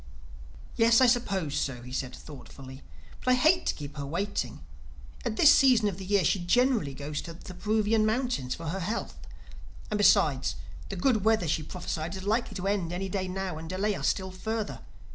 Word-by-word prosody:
"Yes, 230 0 +5
I 260 - +6
suppose 195 - +1
so," 125 -3 -2
he 125 - -10
said 130 -1 -4
thoughtfully. 135 -2 -11 0.4
"But 255 - +3
I - - +5
hate 315 +8 +3
to - - +1
keep 145 0 -8
her 140 - -4
waiting. 170 - -3 0.6
At 230 -2 -2
this 295 - +7
season 250 -6 +5
of 195 -2 -3
the 190 - -7
year 200 -2 +2
she 190 - +2
generally 205 - +2
goes 145 +2 -4
to 170 - -8
the 185 - -10
Peruvian 215 +3 +1
mountains—for 215 - -1
her 190 +4 -3
health. 210 +6 -4 0.7
And 210 - 0
besides, 140 - +3 0.3
the - - -4
good 215 +2 +1
weather 220 -5 +2
she 155 +1 0
prophesied 165 +1 -5
is 190 - -7
likely 215 +1 -1
to 185 0 -4
end 195 -4 0
any 190 +2 -3
day 185 0 -2
now 185 -3 -4
and 160 0 -8
delay 195 +3 0
us - - -2
still 190 -1 -1
further. 205 - -4
190 Hz, 190 wpm, -28 LUFS, 155-220 Hz, 0.7 s, this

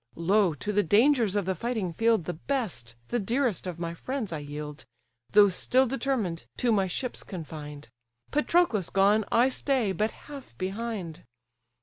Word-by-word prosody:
Lo, 185 0 +2
to 205 +10 -3
the 205 - +4
dangers 225 - +3
of 205 -3 +1
the 190 - 0
fighting 210 -2 -2
field 225 -2 +2
The 175 - -3
best, 160 - -3
the 240 - 0
dearest 235 -1 0
of 175 -2 -5
my 170 -1 -4
friends, 235 +1 -4
I 155 - -3
yield, 150 0 -7 0.5
Though 205 -1 +7
still 255 +8 +2
determined, 235 -9 -2
to 245 - +2
my 195 -3 +2
ships 245 +8 -3
confined; 150 - -8 0.4
Patroclus 300 - +2
gone, 200 +2 +3
I 240 +2 +5
stay 260 -6 0
but 210 +4 0
half 275 - -12
behind. 195 - -4
205 Hz, 155 wpm, -28 LUFS, 170-240 Hz, 0.5 s, Though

